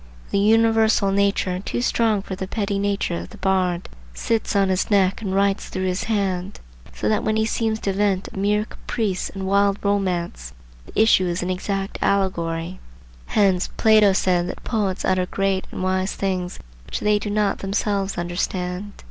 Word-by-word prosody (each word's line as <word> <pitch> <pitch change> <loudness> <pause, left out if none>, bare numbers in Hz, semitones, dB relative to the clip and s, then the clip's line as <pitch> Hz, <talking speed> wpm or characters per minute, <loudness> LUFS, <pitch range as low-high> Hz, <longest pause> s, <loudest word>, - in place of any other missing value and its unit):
The 200 - +2
universal 220 -1 +4
nature, 200 -2 +1
too 240 +5 -3
strong 220 -5 +1
for 190 - -5
the 190 0 -5
petty 200 -1 -2
nature 200 - -1
of 85 - -8
the - - -13
bard, 185 -2 0 0.3
sits 225 - -1
on 195 -1 +3
his 185 0 0
neck 195 0 +2
and 195 -3 -2
writes 195 0 +1
through 185 0 -3
his 185 0 -1
hand; 195 -3 -1 0.3
so 105 - -3
that 110 - +1
when 215 - +1
he 220 0 +2
seems 220 0 -1
to 195 - -1
vent 195 -1 0
a - - -5
mere 210 +2 +1
caprice 205 -5 -3
and 195 -1 -6
wild 200 +1 +3
romance, 180 - -1 0.3
the - - -4
issue 215 -4 +5
is 175 0 -2
an 180 - -1
exact 195 +1 -3
allegory. 175 -3 0 0.5
Hence 190 -3 +2
Plato 215 -2 +5
said 180 -2 +1
that - - -7
"poets 200 -5 -1
utter 185 -1 +1
great 195 0 -1
and - - -5
wise 185 +1 0
things 185 -2 -2 0.3
which - - -4
they 210 0 +3
do 210 - -4
not 205 -1 +1
themselves 200 0 -1
understand." 180 +2 -3
195 Hz, 175 wpm, -22 LUFS, 185-205 Hz, 0.5 s, issue